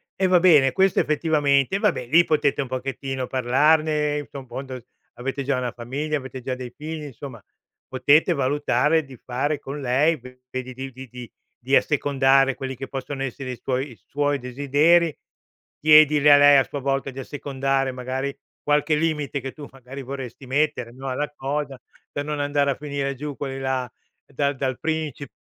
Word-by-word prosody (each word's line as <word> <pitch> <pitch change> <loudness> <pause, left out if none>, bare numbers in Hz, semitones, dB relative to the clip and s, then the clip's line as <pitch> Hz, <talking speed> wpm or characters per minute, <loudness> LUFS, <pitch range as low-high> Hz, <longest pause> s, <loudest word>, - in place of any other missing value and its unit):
E 190 0 +1
va 180 -1 +5
bene 150 -7 +6
questo 190 -1 +3
effettivamente 150 +1 +1
vabbè 125 - +1
lì 170 +6 +6
potete 150 -3 +1
un 135 - -4
pochettino 135 0 -4
parlarne, 150 +3 +2
infondo 130 -1 -7 0.4
avete 135 +3 -4
già 135 0 0
una 125 -2 -2
famiglia, 140 +6 -3
avete 130 -1 -8
già 130 +1 -3
dei 125 -1 -7
figli, 155 0 -6
insomma 135 -4 -9 0.4
potete 145 +6 +3
valutare 145 +2 +1
di 130 -3 -13
fare 140 +5 -2
con 145 +1 -7
lei 140 +6 +2 0.3
vedi 130 0 -5
di 135 +1 -7 0.2
di 125 -2 -10 0.3
-di 135 +2 +2
assecondare 135 -2 +3
quelli 135 0 -5
che 135 +2 -7
possono 135 0 -5
essere 130 0 -5
i 120 - -7
suoi 130 +1 -2
i - - -12
suoi 145 0 0
desideri, 145 +6 +2 0.6
chiedile 150 -1 +6
a 145 - +9
lei 145 0 +7
a 135 - +5
sua 145 - -5
volta 135 0 -1
di 130 - -9
assecondare 135 -1 -1
magari 130 +2 -4 0.3
qualche 150 +1 +2
limite, 150 -3 -1
che 135 +1 -5
tu 145 -2 -10
magari 135 +1 -10
vorresti 130 0 -7
mettere, 140 -3 0
no, 135 +1 -6
alla 145 +3 -2
cosa, 140 0 -3 0.3
per 145 - -3
non 150 0 -3
andare 145 0 +1
a - - -2
finire 140 -1 -3
giù 145 +1 -6
quelli 135 -2 -4
là 130 -2 -2 0.4
dal 140 +1 -1
dal 130 -1 -2
principe 155 -4 -3
140 Hz, 165 wpm, -23 LUFS, 130-150 Hz, 0.6 s, a